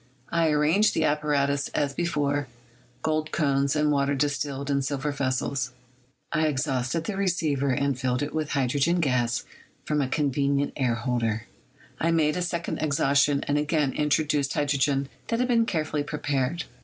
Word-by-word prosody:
I 165 -1 +2
arranged 155 +8 +3
the - - +2
apparatus 145 -2 +1
as 145 -2 0
before 145 -4 0 0.6
[gold 155 0 0
cones 140 -2 +1
and 150 0 +2
water 140 0 +1
distilled 140 0 -1
in 140 0 +2
silver 140 +2 -2
vessels]; 130 -2 -1 0.6
I 155 -1 +2
exhausted 135 +1 -1
the 200 +4 -3
receiver 160 -8 0
and 140 +1 +1
filled 125 +1 0
it 145 - -4
with 155 -2 -2
hydrogen 140 +6 +1
gas 125 -6 +1 0.4
from 150 -1 +1
a 135 - 0
conven 140 0 +1
ient 140 +1 0
air 125 -4 +1
holder; 115 -2 -1 0.5
I 165 - +1
made 155 -2 +2
a 180 - -1
second 170 -1 -2
exhaustion 140 -1 +2
and 145 +1 +2
again 150 -2 +1
introduced 150 -1 +1
hydrogen 140 -1 +1 0.2
that 230 - 0
had 250 +1 +1
been 230 -2 +3
carefully 155 -3 -1
prepared. 145 +1 -1
145 Hz, 155 wpm, -26 LUFS, 135-155 Hz, 0.6 s, arranged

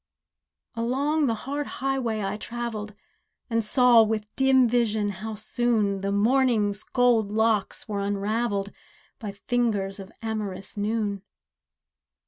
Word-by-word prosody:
Along 275 +6 +1
the 230 - +1
hard 285 +2 -3
highway 255 -5 -1
I 195 - -2
travelled 220 -2 -5 0.6
And 230 0 +2
saw, 245 +1 +6
with 215 -1 0
dim 265 -2 +4
vision, 220 -3 +1
how 215 +3 -5
soon 215 -2 0
The 200 0 -1
morning's 215 -2 +2
gold 240 -5 +2
locks 220 -2 0
were 205 -2 -2
unravelled, 200 +1 -1 0.5
By 210 -3 -5
fingers 205 -3 -1
of 195 +2 -9
amorous 210 -4 -4
noon. 205 -1 -1
220 Hz, 115 wpm, -26 LUFS, 205-240 Hz, 0.6 s, saw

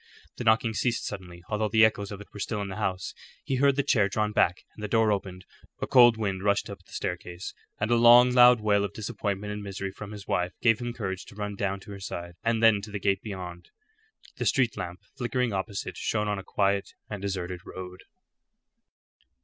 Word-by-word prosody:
The - - -4
knocking 110 0 +3
ceased 115 +2 0
suddenly, 90 -3 -7
although 105 0 -1
the 110 +1 +6
echoes 105 -2 -1
of 100 - -6
it 105 - -14
were 105 - -9
still 105 +1 -2
in 100 - -5
the 95 - -6
house. 95 -4 -2 0.3
He 135 - -1
heard 140 +1 +4
the 140 - +1
chair 105 -7 +3
drawn 105 +1 0
back, 90 -3 +2
and 105 - -10
the - - -1
door 110 0 +3
opened. 95 -2 -3 0.3
A - - -1
cold 120 -3 +6
wind 100 -4 -2
rushed 100 0 +1
up - - -10
the - - -23
staircase, 90 +1 -5 0.3
and 105 +3 0
a - - +5
long 120 +1 +8
loud 125 -1 +7
wail 105 -1 +3
of 100 0 -3
disappointment 105 -2 -3
and 105 - -5
misery 100 -1 -5
from 105 +1 -9
his 105 -2 -9
wife 90 +1 0
gave 115 -2 +3
him 120 -1 -3
courage 95 -5 -4
to - - -14
run 105 -1 -4
down 100 0 -2
to 100 +2 -11
her 100 - -8
side, 85 -2 -6
and 115 0 +1
then 110 -3 +6
to 105 - -8
the 105 - -4
gate 100 0 +1
beyond. 90 -4 -7 0.7
The - - -1
street 125 -4 +2
lamp 90 +1 -6 0.2
flickering 125 -2 -1
opposite 100 +1 -4
shone 105 -1 -1
on 105 -1 -1
a - - -8
quiet 100 0 0
and 105 -2 -6
deserted 90 -2 -3
road. 90 0 -9
105 Hz, 215 wpm, -27 LUFS, 95-110 Hz, 0.7 s, long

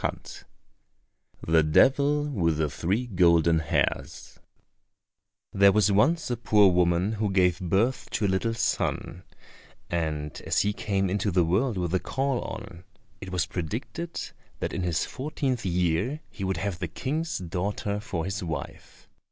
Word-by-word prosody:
29 - - -5 1.0
The 80 0 +5
Devil 140 - +3
With 90 - 0
the 75 -2 0
Three 100 +11 -1
Golden 85 -5 +4
Hairs 80 - -2 1.1
There 100 0 +6
was 105 0 +3
once 140 +9 +2
a 120 - -1
poor 105 -4 +4
woman 90 +2 +2
who 110 -1 -1
gave 90 -3 +2
birth 100 +8 0
to 110 - 0
a - - +3
little 100 +5 0
son; 90 -6 -1 0.7
and 75 -4 -2
as - - +2
he 105 0 0
came 100 -2 -1
into 100 +2 0
the 90 -1 +3
world 105 +7 +1
with 90 -1 -2
a 95 - +3
caul 135 +3 -1
on, 85 +1 -8 0.4
it 95 - -7
was 90 0 0
predicted 115 - -5 0.4
that - - -3
in 90 - -2
his 85 -4 0
fourteenth 130 -5 -3
year 90 - 0
he 105 - -7
would 95 -2 -1
have 95 0 -3
the 90 - -2
King's 155 - -3
daughter 100 +4 -3
for 100 -7 -4
his 95 0 -3
wife. 80 -5 -7
95 Hz, 150 wpm, -27 LUFS, 85-115 Hz, 1.1 s, There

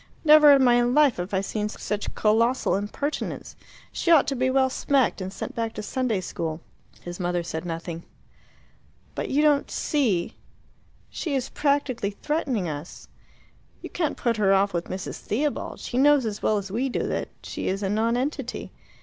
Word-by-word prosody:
"Never 300 -1 +8
in 275 -1 +6
my 245 -1 +5
life 255 +2 +3
have 180 +2 -4
I 190 -1 +1
seen 210 +1 -3
such 210 -1 -4
colossal 230 +3 +2
impertinence. 210 +9 -4 0.4
She - - -2
ought 325 -5 +6
to 275 - -2
be 260 +1 +1
well 265 0 +3
smacked, 265 -6 +1
and 185 0 -4
sent 195 - -6
back 230 -1 -3
to 215 - -5
Sunday 235 -3 -1
school." 160 -2 -4 0.4
His 175 +1 -8
mother 175 -1 -1
said 160 0 -5
nothing. 165 0 -5 1.1
"But - - -3
don't - - -1 0.2
you - - -12
see 230 - 0 0.7
she 305 -5 -3
is 260 - -2
practically 280 -7 0
threatening 250 - -2
us? 150 +2 -7 0.7
You - - -7
can't 315 -4 -1
put 235 -2 0
her 200 -2 +3
off 200 +1 +2
with 170 0 -2
Mrs. 190 +1 -6
Theobald; 285 +7 -2
she 250 - -3
knows 290 -2 +5
as 210 -2 -4
well 215 - +2
as 195 -1 -5
we 250 +6 -1
do - - -2
that - - -3
she - - -5
is 195 +2 -1
a - - 0
nonentity. 230 +7 -1
225 Hz, 175 wpm, -25 LUFS, 195-270 Hz, 1.1 s, Never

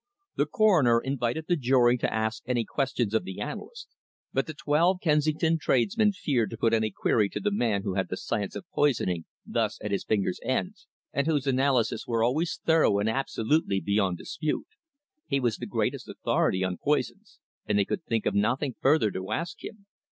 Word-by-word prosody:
The - - +1
Coroner 165 - +4
invited 135 +3 -2
the 175 - +3
jury 125 -4 +3
to - - 0
ask 110 0 -1
any 120 -2 0
questions 125 -6 -1
of 110 - +2
the 95 +1 -7
analyst, 475 - -6 0.5
but - - 0
the 155 - -6
twelve 165 +6 +2
Kensington 155 0 +2
tradesmen 135 - +2
feared 135 - 0
to 115 - -7
put 115 0 +1
any 110 -1 +2
query 105 +1 +1
to - - -4
the 205 - 0
man 110 - 0
who 100 - -2
had 95 -1 -1
the 95 - -3
science 105 -1 -3
of - - -6
poisoning 95 - +1 0.2
thus - - -1
at 105 - -5
his 100 - -1
fingers' 100 -4 0
ends, - - -2 0.3
and 140 - 0
whose 145 -4 +1
analyses 130 -4 +1
were 115 -1 +1
always 160 +11 0
thorough 160 -11 +4
and 105 +2 +1
absolutely 125 -3 0
beyond 100 -3 0
dispute. 155 - -3 0.6
He 140 -2 +1
was 120 -4 0
the - - -6
greatest - - -2
authority 95 0 0
on 90 -1 -2
poisons, - - -2 0.3
and 105 - +2
they 100 - +3
could 170 - -3
think 115 -6 -1
of - - +1
nothing 125 +6 +1
further 135 -6 +3
to 95 +2 -5
ask 165 +6 -3
him. 205 -2 -9
120 Hz, 185 wpm, -27 LUFS, 105-155 Hz, 0.6 s, Coroner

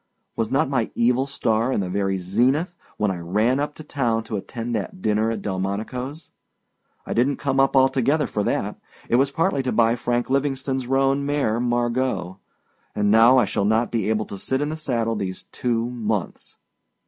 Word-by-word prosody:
Was 115 -1 -1
not 140 +3 +2
my 130 -5 0
evil 125 +3 +2
star 115 -3 0
in - - 0
the 95 - -1
very 95 +1 -1
zenith 125 - +1 0.2
when 105 -2 +1
I 90 - -4
ran 105 +10 +1
up 145 +1 -2
to 155 - -10
town 120 -7 -1
to 110 -1 -5
attend 115 +4 -5
that 105 -4 -3
dinner 110 +2 +1
at 110 -3 -3
Delmonicoâs? 110 - -4 0.7
I - - -3
didnât 130 +4 +2
come 135 -1 -1
up 135 0 +3
altogether 135 +3 +3
for 105 - -2
that. - - -1 0.3
It 120 - +4
was 135 +2 +3
partly 160 0 0
to 130 -1 -2
buy 115 0 +3
Frank 120 0 -1
Livingstoneâs 135 -1 -1
roan 135 +1 +2
mare 140 -6 0
Margot. 120 -6 -1 0.6
And 105 -1 +2
now 115 +4 +7
I 125 - +5
shall 100 - -1
not 110 +3 +2
be 110 -3 0
able 110 -1 0
to 100 - -8
sit 130 +6 -1
in 145 +1 -1
the 155 - -3
saddle 120 -7 -1
these 95 -3 -4
two 120 -1 -1
months. 110 -6 -4
120 Hz, 185 wpm, -23 LUFS, 110-135 Hz, 0.7 s, now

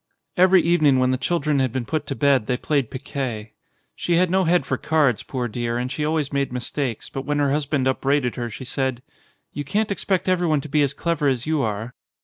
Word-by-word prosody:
Every 185 0 +5
evening 155 -5 +4
when 130 0 +2
the 130 - +1
children 150 -4 0
had 130 -2 +1
been 125 0 -3
put 155 +4 -2
to 135 - -3
bed 140 -6 +2
they 125 - 0
played 140 -3 0
piquet. 130 -5 -5 0.4
She 175 - 0
had 180 0 +3
no 190 0 +3
head 175 +2 +2
for - - -1
cards, 150 -8 +1
poor 125 -3 -3
dear, 120 +1 -2
and 125 +1 -3
she 150 - -2
always 150 -2 -1
made 140 -2 0
mistakes, 125 -1 -3
but 135 - -5
when 145 +1 -1
her 145 -1 +2
husband 145 -2 0
upbraided 135 -1 +1
her, 120 -2 -3
she 120 +4 -8
said: 130 -1 -2 0.5
"You 145 - -4
can't 205 +9 -1
expect 190 -2 -1
everyone 175 -5 +2
to 155 - -9
be 150 +1 +2
as 140 -1 +1
clever 165 -4 0
as 130 -3 0
you 155 -2 +1
are." 110 +1 -3
140 Hz, 220 wpm, -23 LUFS, 125-155 Hz, 0.5 s, Every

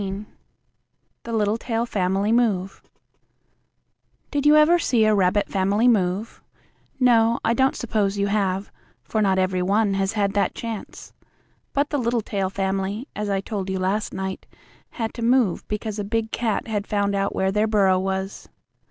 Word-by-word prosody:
XIII 195 +1 -4 1.0
THE 230 - -5
LITTLETAIL 225 +2 0
FAMILY 195 -1 0
MOVE 210 -6 +1 1.5
Did 290 0 +1
you 300 - +7
ever 310 +3 +5
see 235 -9 +2
a 215 - +4
rabbit 200 0 +2
family 200 +4 +1
move? 200 -1 0 0.6
No, 235 -2 +4
I 230 - +3
don't 265 +3 +2
suppose 210 -4 -1
you 200 - +1
have, 200 -1 -1 0.3
for 220 - -1
not 195 -2 +2
every 185 -1 +1
one 200 +2 +2
has 195 +1 0
had 200 -2 0
that 205 - 0
chance. 225 -3 -7 0.6
But 285 +1 0
the 290 - 0
Littletail 225 -5 -1
family, 195 +5 -2
as 210 0 -3
I 195 -1 0
told 195 -2 -4
you 190 - -1
last 195 +3 -1
night, 190 0 -5 0.4
had 225 -2 -4
to 235 - -7
move 235 -5 +2
because 210 0 -4
a - - -1
big 225 +2 -2
cat 230 -2 -1
had 210 -2 -3
found 200 -1 0
out 195 0 -1
where 190 0 +1
their 210 +2 +1
burrow 195 -4 +3
was. 190 +1 -4
205 Hz, 160 wpm, -23 LUFS, 195-230 Hz, 1.5 s, you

